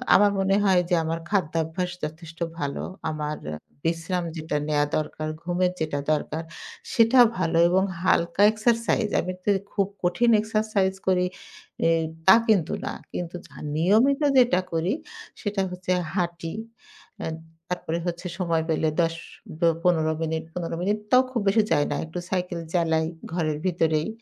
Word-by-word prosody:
আমার 205 Hz, 0 st, +6 dB
মনে 195 Hz, +1 st, +2 dB
হয় 185 Hz, -3 st, +4 dB
যে 175 Hz, -, +4 dB
আমার 165 Hz, +1 st, -2 dB
খাদ্যাভ্যাস 170 Hz, -1 st, -1 dB
যথেষ্ট 160 Hz, +2 st, -7 dB, 0.2 s
ভালো। 140 Hz, -1 st, -2 dB, 0.3 s
আমার 150 Hz, -1 st, -3 dB, 0.2 s
আ -, -, -3 dB, 0.3 s
বিশ্রাম 165 Hz, +2 st, -1 dB
যেটা 155 Hz, -2 st, -2 dB
নেওয়া 145 Hz, -1 st, +2 dB
দরকার, 155 Hz, 0 st, -3 dB
ঘুমের 180 Hz, +1 st, +1 dB
যেটা 155 Hz, -2 st, -1 dB
দরকার। 155 Hz, +1 st, -1 dB, 0.5 s
সেটা 230 Hz, +2 st, +5 dB, 0.2 s
ভালো 165 Hz, -2 st, +1 dB
এবং 190 Hz, +2 st, +3 dB, 0.2 s
হালকা 170 Hz, +1 st, +2 dB
এক্সারসাইজ, 230 Hz, 0 st, +1 dB
আমি 185 Hz, -, -4 dB
তে 205 Hz, -, +3 dB, 0.2 s
খুব 195 Hz, -1 st, +1 dB, 0.2 s
কঠিন 180 Hz, +7 st, +2 dB
এক্সারসাইজ 215 Hz, -3 st, 0 dB
করি 180 Hz, -1 st, +3 dB, 0.6 s
এ -, -, +4 dB, 0.4 s
তা 190 Hz, -, +10 dB
কিন্তু 190 Hz, -7 st, +3 dB
না। -, -, -3 dB, 0.2 s
কিন্তু 175 Hz, 0 st, -4 dB
যা -, -, -19 dB, 0.2 s
নিয়মিত 220 Hz, -, +3 dB, 0.2 s
যেটা 240 Hz, -7 st, +5 dB
করি, 165 Hz, +6 st, 0 dB, 0.5 s
সেটা 205 Hz, -2 st, -1 dB
হচ্ছে 180 Hz, 0 st, -4 dB, 0.2 s
হাঁটি। 170 Hz, -3 st, -2 dB, 0.7 s
আ -, -, -2 dB, 0.5 s
তারপরে 170 Hz, -1 st, -2 dB
হচ্ছে 175 Hz, +1 st, -3 dB
সময় 165 Hz, -3 st, +1 dB
পেলে 160 Hz, 0 st, +2 dB
১০ 165 Hz, 0 st, +1 dB, 0.4 s
বা 170 Hz, -, +4 dB, 0.2 s
১৫ 160 Hz, -3 st, +3 dB
মিনিট 160 Hz, 0 st, -1 dB
১৫ 170 Hz, -2 st, -3 dB
মিনিট 205 Hz, +3 st, +1 dB
তাও 255 Hz, 0 st, +7 dB
খুব 235 Hz, -4 st, -1 dB
বেশি 210 Hz, +2 st, +4 dB
যাই 145 Hz, -2 st, +4 dB
না। -, -, 0 dB
একটু 165 Hz, +3 st, -6 dB
সাইকেল 180 Hz, -2 st, -2 dB
চালাই 160 Hz, -2 st, +2 dB, 0.3 s
ঘরের 155 Hz, -4 st, 0 dB
ভেতরেই, 160 Hz, -2 st, +1 dB
175 Hz, 150 wpm, -25 LUFS, 160-195 Hz, 0.7 s, তা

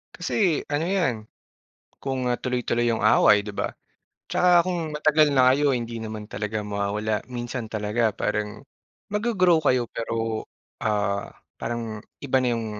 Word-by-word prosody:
kasi -, -, -4 dB, 0.4 s
ano 150 Hz, +3 st, +1 dB
'yan 165 Hz, -11 st, +2 dB, 0.9 s
kung, 135 Hz, -1 st, -2 dB
ah, 120 Hz, -, +2 dB
tuloy-tuloy 125 Hz, -1 st, 0 dB
'yong 115 Hz, -, -1 dB
away, 105 Hz, -1 st, +6 dB
'di 105 Hz, 0 st, -7 dB
ba? -, -, 0 dB, 0.6 s
Tsaka 180 Hz, -1 st, +5 dB
kung 170 Hz, -4 st, -2 dB
matagal 150 Hz, 0 st, +4 dB
na 130 Hz, -2 st, +6 dB
kayo, 145 Hz, 0 st, +2 dB
hindi 115 Hz, -1 st, -3 dB
naman 110 Hz, -1 st, -6 dB
talaga 105 Hz, +1 st, -3 dB
mawawala. 105 Hz, +1 st, -2 dB
Minsan 120 Hz, -1 st, -4 dB
talaga 110 Hz, +1 st, 0 dB
parang 105 Hz, 0 st, -2 dB, 0.5 s
mag-go-grow 205 Hz, -5 st, +3 dB
kayo 125 Hz, -2 st, +2 dB
pero, 115 Hz, -1 st, -3 dB, 0.4 s
ah, 100 Hz, -2 st, 0 dB, 0.3 s
parang 115 Hz, -3 st, -4 dB, 0.2 s
iba 135 Hz, -2 st, +1 dB
na -, -, +1 dB
'yong 115 Hz, -1 st, -2 dB
115 Hz, 140 wpm, -25 LUFS, 105-140 Hz, 0.9 s, away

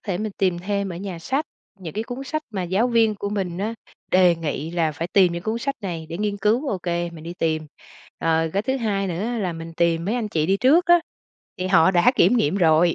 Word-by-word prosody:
thể 190 Hz, -4 st, -2 dB
mình 215 Hz, 0 st, -3 dB
tìm 185 Hz, -3 st, +1 dB
thêm 200 Hz, +2 st, -2 dB
ở -, -, -6 dB
nhà 185 Hz, -1 st, -6 dB
sách, 265 Hz, -, -1 dB, 0.3 s
những 170 Hz, -4 st, -8 dB
cái 220 Hz, +2 st, -2 dB
cuốn 255 Hz, +3 st, -6 dB
sách 310 Hz, +3 st, -3 dB
mà 195 Hz, -4 st, -3 dB
giáo 190 Hz, +7 st, +1 dB
viên 225 Hz, -3 st, +3 dB
của 200 Hz, 0 st, -4 dB
mình 190 Hz, -4 st, -3 dB
á, 215 Hz, +4 st, -2 dB, 0.4 s
đề 180 Hz, -2 st, +5 dB
nghị 160 Hz, -1 st, -4 dB
là 165 Hz, -3 st, 0 dB
phải 165 Hz, +3 st, -4 dB
tìm 185 Hz, -3 st, +5 dB
những 170 Hz, 0 st, -4 dB
cuốn 220 Hz, +1 st, -2 dB
sách 275 Hz, +3 st, -2 dB
này 170 Hz, -6 st, -5 dB
để 170 Hz, +1 st, -5 dB
nghiên 210 Hz, -1 st, -1 dB
cứu, 220 Hz, +8 st, +1 dB
ô 190 Hz, -, -1 dB
kê, 175 Hz, -1 st, -2 dB
mình 160 Hz, -2 st, -11 dB
đi 170 Hz, +1 st, -6 dB
tìm. 155 Hz, -1 st, 0 dB, 0.5 s
Rồi 165 Hz, 0 st, +1 dB
cái 200 Hz, +5 st, 0 dB
thứ 265 Hz, +3 st, -1 dB
hai 200 Hz, -5 st, -1 dB
nữa 180 Hz, +3 st, -3 dB
là 185 Hz, -5 st, -1 dB
mình 165 Hz, 0 st, -8 dB
tìm 170 Hz, -1 st, +1 dB
mấy 210 Hz, -, -1 dB
anh 230 Hz, -4 st, -2 dB
chị 155 Hz, -5 st, 0 dB
đi 195 Hz, +2 st, +3 dB
trước 295 Hz, -, +4 dB
đó, 345 Hz, 0 st, +7 dB, 0.6 s
thì 185 Hz, -, -2 dB
họ 185 Hz, -2 st, +5 dB
đã 185 Hz, +8 st, +4 dB
kiểm 200 Hz, +8 st, +5 dB
nghiệm 190 Hz, -4 st, +1 dB
rồi, 165 Hz, -1 st, +4 dB
185 Hz, 250 wpm, -23 LUFS, 170-215 Hz, 0.6 s, đó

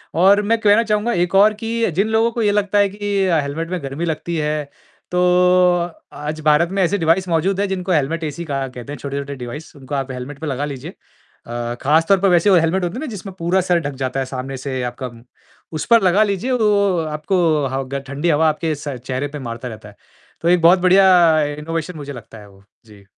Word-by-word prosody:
और 195 Hz, +4 st, +5 dB
मैं 225 Hz, +2 st, +1 dB
कहना 210 Hz, +2 st, +4 dB
चाहूँगा 215 Hz, +2 st, 0 dB
एक 175 Hz, +1 st, 0 dB
और 210 Hz, +2 st, +6 dB
कि 230 Hz, -1 st, 0 dB
जिन 200 Hz, +3 st, +2 dB
लोगों 225 Hz, +1 st, +2 dB
को 230 Hz, -, -3 dB
ये 205 Hz, -1 st, +3 dB
लगता 205 Hz, 0 st, 0 dB
है 200 Hz, -1 st, +3 dB
कि 200 Hz, -1 st, -1 dB
अ, 165 Hz, -3 st, +2 dB
हेलमेट 155 Hz, +4 st, -4 dB
में 180 Hz, -3 st, -3 dB
गर्मी 140 Hz, +5 st, -4 dB
लगती 165 Hz, +1 st, -3 dB
है 150 Hz, -1 st, -2 dB, 0.4 s
तो 180 Hz, -, 0 dB, 0.9 s
आज 150 Hz, +2 st, -5 dB
भारत 155 Hz, +3 st, +3 dB
में 195 Hz, 0 st, 0 dB
ऐसे 200 Hz, +4 st, +1 dB
डिवाइस 170 Hz, +2 st, +1 dB
मौजूद 185 Hz, +4 st, 0 dB
है -, -, +1 dB
जिनको 185 Hz, -1 st, -3 dB
हेलमेट 160 Hz, +1 st, 0 dB
एसी 155 Hz, +3 st, -4 dB
कहा 135 Hz, -2 st, -3 dB
कहते 125 Hz, +2 st, -9 dB
हैं। 140 Hz, -, -8 dB
छोटे-छोटे 140 Hz, 0 st, -5 dB
डिवाइस 135 Hz, +6 st, -8 dB
उनको 140 Hz, +1 st, -7 dB
आप 135 Hz, -1 st, -3 dB
हेलमेट 130 Hz, +3 st, -7 dB
पे 160 Hz, -, -5 dB
लगा 140 Hz, +1 st, -2 dB
लीजिए। 135 Hz, -3 st, -7 dB, 0.6 s
अ, 120 Hz, 0 st, -4 dB
खास 160 Hz, +4 st, +2 dB
तौर 195 Hz, -2 st, +5 dB
पर 195 Hz, 0 st, +3 dB
वैसे 175 Hz, +3 st, +4 dB
वो -, -, +6 dB
हेलमेट 170 Hz, +3 st, +1 dB
होते 175 Hz, -, -4 dB
हैं -, -, -4 dB
ना -, -, -3 dB
जिसमें 195 Hz, 0 st, -8 dB
पूरा 180 Hz, +3 st, +1 dB
सर 175 Hz, -1 st, +1 dB
ढक 140 Hz, -, -6 dB
जाता 130 Hz, +1 st, -2 dB
है 135 Hz, -, -1 dB
सामने 130 Hz, 0 st, -5 dB
से 130 Hz, -1 st, -4 dB
आपका, 125 Hz, +1 st, -5 dB, 0.6 s
उस 155 Hz, -, -4 dB
पर 230 Hz, -1 st, +5 dB
लगा 190 Hz, +4 st, +4 dB
लीजिए 205 Hz, +5 st, -2 dB
वो 200 Hz, -6 st, +2 dB
आपको 155 Hz, +5 st, -1 dB, 0.3 s
ह 135 Hz, 0 st, -1 dB
ग 140 Hz, -, -1 dB
ठंडी 145 Hz, +5 st, -2 dB
हवा 160 Hz, +1 st, +3 dB
आपके 155 Hz, +1 st, -2 dB
स 145 Hz, 0 st, -7 dB, 0.2 s
चेहरे 130 Hz, +2 st, -2 dB
पर 150 Hz, 0 st, -7 dB
मारता 120 Hz, +2 st, -6 dB
रहता 110 Hz, -2 st, -9 dB
है। 100 Hz, -, -17 dB, 0.5 s
तो 170 Hz, -, +1 dB
एक 180 Hz, -1 st, +4 dB
बहुत 175 Hz, +3 st, +6 dB
बढ़िया 185 Hz, +2 st, +5 dB, 0.5 s
इनोवेशन 165 Hz, +2 st, -4 dB
मुझे 145 Hz, -1 st, -7 dB
लगता 115 Hz, -2 st, -11 dB
है 100 Hz, -1 st, -14 dB
वो। 100 Hz, 0 st, -20 dB, 0.2 s
जी। 105 Hz, -2 st, -17 dB
165 Hz, 230 wpm, -19 LUFS, 140-195 Hz, 0.9 s, और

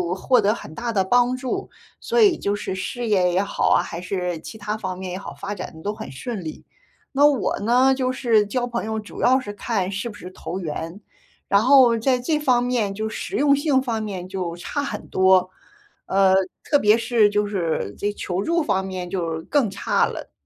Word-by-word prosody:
获 250 Hz, +5 st, +3 dB
得 210 Hz, +1 st, +3 dB
很 155 Hz, -, -10 dB
大 235 Hz, +4 st, -3 dB
的 195 Hz, -3 st, +2 dB
帮 245 Hz, +5 st, +3 dB
助。 255 Hz, -1 st, -4 dB, 0.3 s
所 475 Hz, -1 st, 0 dB
以 400 Hz, -6 st, +5 dB
就 200 Hz, 0 st, -1 dB
是 195 Hz, -, -4 dB
事 235 Hz, +6 st, -4 dB
业 185 Hz, -4 st, +3 dB
也 185 Hz, -, +3 dB
好 200 Hz, -, 0 dB
啊， -, -, +5 dB
还 170 Hz, -, -6 dB
是 180 Hz, -3 st, -3 dB
其 220 Hz, -, -10 dB
它 210 Hz, +1 st, -3 dB
方 185 Hz, -3 st, -4 dB
面 185 Hz, -1 st, -6 dB
也 185 Hz, -, -3 dB
好， 195 Hz, -, -8 dB
发 200 Hz, +1 st, -5 dB
展 185 Hz, -, -6 dB
得 160 Hz, -, -11 dB
都 205 Hz, -, -2 dB
很 220 Hz, -11 st, -8 dB
顺 195 Hz, -, -5 dB
利。 155 Hz, -, -7 dB, 0.5 s
那 280 Hz, +2 st, +4 dB
我 275 Hz, -8 st, 0 dB
呢， 250 Hz, +5 st, +4 dB
就 255 Hz, -1 st, 0 dB
是 230 Hz, -5 st, +2 dB
交 245 Hz, +4 st, -1 dB
朋 235 Hz, -2 st, -3 dB
友 220 Hz, 0 st, -2 dB
主 210 Hz, -, -9 dB
要 260 Hz, +1 st, +4 dB
是 205 Hz, -6 st, -6 dB
看 200 Hz, -3 st, -2 dB
是 210 Hz, +4 st, -3 dB
不 210 Hz, -, -11 dB
是 180 Hz, -2 st, -9 dB
投 185 Hz, 0 st, -6 dB
缘， 165 Hz, +2 st, -5 dB, 0.5 s
然 200 Hz, +1 st, +4 dB
后 255 Hz, -2 st, +6 dB
在 250 Hz, +2 st, +1 dB
这 300 Hz, +5 st, 0 dB
方 255 Hz, -5 st, +3 dB
面 240 Hz, -5 st, 0 dB
就 215 Hz, +2 st, -3 dB
实 -, -, -5 dB
用 280 Hz, 0 st, +4 dB
性 285 Hz, -2 st, +2 dB
方 230 Hz, -4 st, -2 dB
面 190 Hz, -4 st, -5 dB
就 180 Hz, -3 st, -4 dB
差 285 Hz, -, -4 dB
很 -, -, -5 dB
多， 185 Hz, -1 st, +4 dB, 0.6 s
呃， 190 Hz, -1 st, +3 dB, 0.3 s
特 290 Hz, -, +3 dB
别 210 Hz, -1 st, +5 dB
是 230 Hz, -2 st, +3 dB
就 210 Hz, 0 st, +1 dB
是 170 Hz, -, -2 dB
这 205 Hz, -, -1 dB
求 185 Hz, -1 st, -3 dB
助 335 Hz, +5 st, +1 dB
方 190 Hz, -9 st, 0 dB
面 185 Hz, -2 st, -5 dB
就 165 Hz, -4 st, -3 dB
更 275 Hz, -6 st, +2 dB
差 195 Hz, -, +1 dB
了。 -, -, -7 dB
210 Hz, 230 characters per minute, -22 LUFS, 190-245 Hz, 0.6 s, 后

